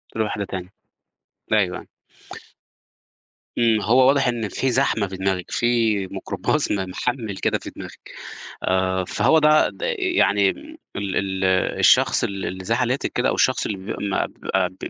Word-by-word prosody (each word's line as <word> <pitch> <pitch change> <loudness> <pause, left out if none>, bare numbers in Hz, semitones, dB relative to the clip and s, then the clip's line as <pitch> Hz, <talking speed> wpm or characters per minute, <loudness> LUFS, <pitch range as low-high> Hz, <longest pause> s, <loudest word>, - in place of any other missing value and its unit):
لواحدة 105 -2 -2
تانية. 95 0 -7 0.8
أيوه، 110 - +5 0.2
أيوه. - - -12 1.7
إمم، 115 -2 +3
ما 105 - -3
هو 130 +4 +5
واضح 140 0 +3
إن 115 -3 -2
في 130 +4 -1
زحمة 120 -5 +1
في 95 0 -8
دماغِك، 95 -1 -2
في 115 -5 +1
ميكروباص 100 +9 -2
م - - +2
محَمِّل 110 0 -3
كده - - 0
في - - -8
دماغِك. - - -11 0.5
آآ 95 0 +1
فهو 160 - +3
ده 155 0 +4
د - - -15 0.2
يعني 105 - +2
م 310 +1 -13 0.2
ال 100 -2 -3
ال 95 -1 -2 0.4
الشخص - - +4
اللي 100 -1 -3
اللي 95 +1 -6
زي 115 - +1
حالاتِك 125 +2 -1
كده - - +1
أو - - 0
الشخص - - +1
اللي 105 - -3
بي 95 +4 -6
ما 95 - 0
بيبقى 95 -1 -2
ب 90 - -20
105 Hz, 165 wpm, -22 LUFS, 95-125 Hz, 1.7 s, أيوه